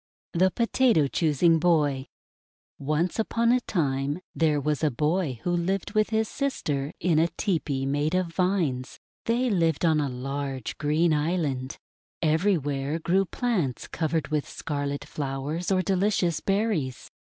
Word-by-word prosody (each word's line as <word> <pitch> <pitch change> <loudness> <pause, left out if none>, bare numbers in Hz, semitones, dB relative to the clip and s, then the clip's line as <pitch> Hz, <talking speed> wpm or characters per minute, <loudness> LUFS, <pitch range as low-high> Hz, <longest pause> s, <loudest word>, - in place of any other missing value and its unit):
THE 185 +2 +4
POTATO 230 - +3
CHOOSING 165 +2 +3
BOY 155 -4 +3
New - - -3
Tale 130 - -8 0.8
ONCE 165 +7 0
upon 230 +1 +2
a 250 - +4
time, 145 - -1
there 155 -3 +2
was 150 +2 -1
a 155 - +4
boy 150 0 0
who 175 - 0
lived 180 +3 -1
with 215 0 +2
his 220 0 +1
sister 150 - -2
in 165 -2 +2
a 165 - +4
tepee 150 -9 -1
made 145 +4 0
of 180 -2 -1
vines. 165 -9 0 0.3
They 240 +1 +1
lived 165 -4 +2
on 160 -2 +3
a 140 - -1
large 135 0 -4
green 155 +3 +2
island. 150 -4 -1 0.5
Everywhere 155 -4 +1
grew 185 +4 +1
plants 185 - -1
covered 160 -2 -1
with 150 -2 -1
scarlet 145 -2 -3
flowers 145 +5 -3
or 185 -1 +2
delicious 190 -2 +1
berries. 195 - -1
160 Hz, 145 wpm, -26 LUFS, 145-185 Hz, 0.8 s, THE